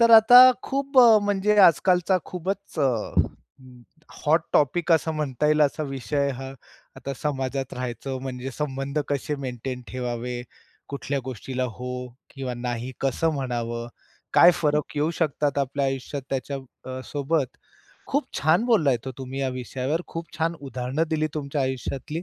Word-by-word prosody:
तर 230 0 +6
आता 245 +3 +10
खूप 275 0 -1
अ, 230 -3 +8
म्हणजे 205 +1 +2
आजकालचा 180 +1 +4
खूपच 190 +3 -5
अ, - - +3 1.4
हॉट - - +4
टॉपिक 165 +4 +2
असं 160 0 +2
म्हणता 150 -2 -1
येईल 150 0 +3
असा 150 +2 +1
विषय 135 0 -1
हा. 135 0 -6 0.5
आता 140 - -5
समाजात 135 -2 -2
राहायचं 125 +1 -4
म्हणजे 130 0 -5
संबंध 140 +1 -3
कसे 145 +1 -1
मेंटेन 125 0 -5
ठेवावे, 125 -1 -4 0.5
कुठल्या 140 0 -3
गोष्टीला 130 +1 -4
हो 125 0 -5 0.2
किंवा 130 -2 -5
नाही 120 +1 -4
कसं 135 +5 +1
म्हणावं, 120 -3 -3 0.5
काय 175 - +9
फरक 150 -1 0
येऊ 150 +3 +1
शकतात 145 -3 0
आपल्या 140 0 0
आयुष्यात 135 +1 -3
त्याच्या 135 +1 -2 0.3
अ, 130 0 -5
...सोबत. 145 -1 -1 0.5
खूप - - 0
छान 160 +9 +3
बोलला 190 - +4
आहेत 125 0 -2
हो 130 - -4
तुम्ही 130 +1 -5
या 135 - 0
विषयावर. 130 +5 -3
खूप 165 0 -6
छान 165 +1 +1
उदाहरणं 130 +3 -2
दिली 155 -1 +1
तुमच्या 145 -1 -2
आयुष्यातली. 130 +5 -3
140 Hz, 145 wpm, -25 LUFS, 130-160 Hz, 1.4 s, आता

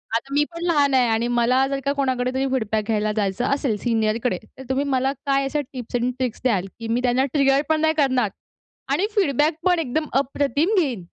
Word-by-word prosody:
आता 270 +4 -3
मी 295 +1 +4
पण 335 - -6
लहान 290 -5 +2
आहे 255 -2 +4
आणि 225 +2 +1
मला 245 +2 +2
जर 275 0 -2
का 280 - +2
कोणाकडे 255 -2 0
तरी 265 +1 0
फीडबॅक 220 -4 -1
घ्यायला 215 -1 0
जायचं 205 +4 0
असेल 275 -5 0
सीनियरकडे 225 -2 0 0.2
तर 265 - -9
तुम्ही 265 +2 +1
मला 265 0 +1
काय 275 -1 +2
अशा 295 +2 -1
टिप्स 245 -1 -6
एंड 245 +1 +1
ट्रिक्स 250 -4 -3
द्याल, 200 -7 +1
की 230 - -5
मी 235 +2 0
त्यांना 250 +2 +2
ट्रिगर 275 -1 +3
पण 315 0 +2
नाही 315 0 +3
करणार 260 -7 +2 0.6
आणि 395 - +2
फीडबॅक 300 - +2
पण 360 -2 +3
एकदम 310 +1 -1
अप्रतिम 285 - 0
घेईन? 260 - -1
260 Hz, 205 wpm, -22 LUFS, 235-280 Hz, 0.6 s, मी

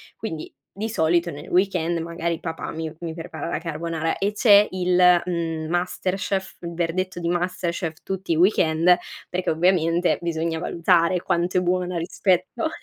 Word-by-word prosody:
Quindi 160 -9 -6 0.2
di 215 +3 -3
solito 170 -4 +1
nel 145 - -9
weekend, 180 -2 +1
magari 170 0 -3
papà 165 -1 -5
mi 160 -1 -5
mi 170 -2 -5
prepara 160 -2 -6
la - - -2
carbonara 165 0 -3
e 200 +2 0
c'è 210 -2 +6
il, 180 -1 +4
mhmm, 165 -3 -2
masterchef, 190 +2 -2
il 170 -1 -6
verdetto 175 +2 -2
di 170 - -3
masterchef 175 -2 -2
tutti 190 -2 -4
i - - +1
weekend, 175 -2 +4 0.3
perché 180 0 -2
ovviamente 170 +1 +2
bisogna 165 -1 -2
valutare 170 +1 +2
quanto 175 +1 0
è - - +3
buona 180 0 0
rispetto 185 - 0
175 Hz, 150 wpm, -23 LUFS, 165-185 Hz, 0.3 s, c'è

